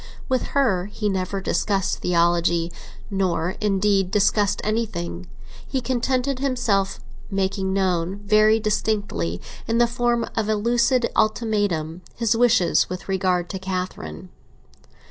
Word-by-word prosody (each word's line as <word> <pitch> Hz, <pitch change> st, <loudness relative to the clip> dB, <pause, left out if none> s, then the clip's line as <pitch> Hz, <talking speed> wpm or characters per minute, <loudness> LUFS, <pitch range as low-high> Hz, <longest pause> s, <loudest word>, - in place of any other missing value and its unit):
With 255 Hz, -1 st, 0 dB
her 195 Hz, -10 st, +2 dB
he 210 Hz, 0 st, -2 dB
never 190 Hz, 0 st, -2 dB
discussed 195 Hz, +2 st, 0 dB
theology, 170 Hz, -1 st, +2 dB, 0.4 s
nor, 185 Hz, -3 st, 0 dB
indeed, 200 Hz, -2 st, +2 dB
discussed 205 Hz, 0 st, +2 dB
anything; 90 Hz, -, -3 dB, 0.4 s
he 265 Hz, -, -1 dB
contented 255 Hz, +1 st, -1 dB
himself 235 Hz, -8 st, 0 dB
with -, -, -19 dB, 0.3 s
making 190 Hz, 0 st, 0 dB
known, 185 Hz, -2 st, 0 dB
very 215 Hz, +1 st, +5 dB
distinctly, 205 Hz, -, -1 dB, 0.3 s
in 230 Hz, -, +1 dB
the 240 Hz, -, +5 dB
form 240 Hz, 0 st, 0 dB
of 220 Hz, -2 st, -1 dB
a 215 Hz, -, +3 dB
lucid 235 Hz, +3 st, +2 dB
ultimatum, 205 Hz, -7 st, 0 dB
his 230 Hz, -1 st, +1 dB
wishes 230 Hz, -6 st, +3 dB
with 185 Hz, +1 st, -6 dB
regard 185 Hz, -2 st, 0 dB
to 190 Hz, -, -4 dB
Catherine. 185 Hz, -, -5 dB
200 Hz, 125 wpm, -23 LUFS, 180-230 Hz, 0.4 s, very